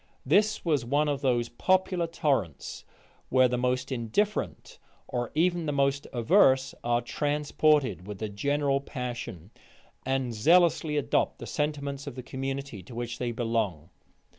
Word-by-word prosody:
This 210 -1 +2
was 150 -7 +2
one 145 +5 +1
of 140 -2 -1
those 120 -3 +1
popular 185 +4 +1
torrents, 135 - -2 0.4
where 130 0 +5
the 125 - -1
most 125 +2 -1
indifferent, 130 - -2 0.3
or 120 -2 -2
even 170 0 +1
the - - +1
most 140 0 +1
averse, 135 - +4
are 120 0 +1
transported 145 - +1
with 105 -1 -6
the 110 - -3
general 140 +6 0
passion, 120 - -6 0.5
and 130 -2 -1
zealously 160 +4 +3
adopt 145 - +1
the - - -8
sentiments 140 -1 -3
of 140 - -6
the 130 - -7
community 135 -4 -5
to 115 +7 -12
which 120 0 -4
they 120 -1 -1
belong. 110 -9 -2
135 Hz, 140 wpm, -28 LUFS, 120-150 Hz, 0.5 s, where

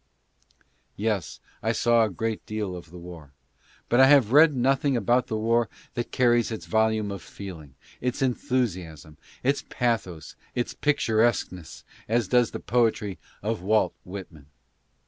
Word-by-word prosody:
Yes, 105 -3 -2 0.2
I 110 +2 0
saw 120 0 +3
a 110 - +1
great 110 +3 -3
deal 105 -4 -3
of 85 -2 -10
the 90 - -11
war, 85 -5 -11 0.5
but 120 - +2
I 130 - +8
have 135 -6 +5
read 150 +1 +6
nothing 135 +1 +2
about 120 +3 +2
the 110 - -2
war 115 0 +1 0.2
that 120 -2 -4
carries 120 -2 +3
its 110 -2 -6
volume 110 -2 +1
of 100 - -6
feeling, 80 -9 -10 0.3
its 125 0 -2
enthusiasm, 95 - -2 0.3
its 140 +2 +1
pathos, 110 - -2 0.2
its 120 - -1
picturesqueness, 110 - 0 0.3
as 115 -2 +1
does 120 +2 +3
the - - -6
poetry 110 -6 0 0.2
of 110 -2 -2
Walt 110 +4 +2
Whit 95 +1 -8
man. 75 -3 -17
110 Hz, 145 wpm, -26 LUFS, 95-120 Hz, 0.5 s, I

